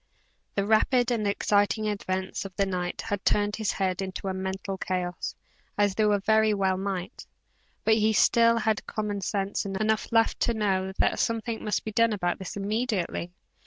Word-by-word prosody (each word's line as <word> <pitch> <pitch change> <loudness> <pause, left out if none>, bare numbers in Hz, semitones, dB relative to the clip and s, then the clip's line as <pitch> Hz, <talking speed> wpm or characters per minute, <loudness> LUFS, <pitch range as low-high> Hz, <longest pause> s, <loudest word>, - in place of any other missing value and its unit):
The 200 - +1
rapid 240 +3 +3
and 220 -3 0
exciting 205 +1 +1
events 190 -3 -2
of 195 -2 -9
the 200 - +2
night 180 -2 -3
had 205 -3 -3
turned 205 0 +1
his 220 -2 -1
head 190 -1 -1
into 190 0 -5
a - - -1
mental 190 +1 -4
chaos, 180 -1 -3 0.4
as 205 -1 +3
they 215 +2 +2 0.2
very 220 -1 +4
well 190 -1 +1
might, 190 +1 -4 0.6
but 220 - +4
he 220 0 +3
still 230 +2 +4
had 220 -2 0
commonsense 200 -2 -2
enough 215 +4 -1
left 225 0 +3
to 235 - +1
know 190 -3 0
that - - +2
something 230 0 -1
must 210 -3 -1
be 220 - -3
done 230 +1 +3
about 175 -4 -1
this 190 +1 -6
immediately. 200 -4 -2
205 Hz, 165 wpm, -27 LUFS, 190-220 Hz, 0.6 s, very